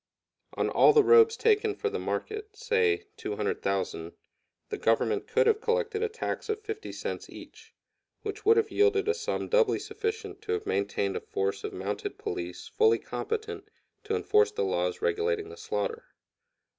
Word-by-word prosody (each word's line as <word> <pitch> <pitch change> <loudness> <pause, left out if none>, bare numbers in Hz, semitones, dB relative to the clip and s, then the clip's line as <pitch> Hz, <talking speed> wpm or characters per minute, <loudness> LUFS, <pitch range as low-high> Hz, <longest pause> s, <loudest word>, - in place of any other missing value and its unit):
On - - +1
all - - +6
the 440 -1 +6
robes 450 +1 +6
taken 435 -2 +2
for 440 - -2
the 440 0 -2
market, 430 0 -4
say, 450 -2 +1
200,000, 95 -5 -2 0.6
the - - -3
Government 255 - +1
could - - +3
have 440 -1 +3
collected 460 -2 0
a 450 - +1
tax 445 0 -4
of 430 0 -1
50 435 0 -5
cents - - -5
each, - - -13 0.5
which 420 - -5
would 445 +2 +5
have 440 -2 +2
yielded 415 0 +3
a 440 - +4
sum 465 +1 -3
doubly 485 -1 +3
sufficient 430 -1 -4
to 435 0 -2
have 430 -1 -2
maintained 435 -1 -1
a 450 - -2
force 430 -1 -2
of 420 - -3
mounted 405 +1 -4
police 415 -5 -5
fully 445 0 +4
competent 435 -1 -5 0.4
to 440 +1 0
enforce 435 +1 +3
the 450 +2 -2
laws 450 +2 -1
regulating 435 -2 0
the 445 - -9
slaughter. 455 +1 -3
435 Hz, 165 wpm, -28 LUFS, 420-450 Hz, 0.6 s, all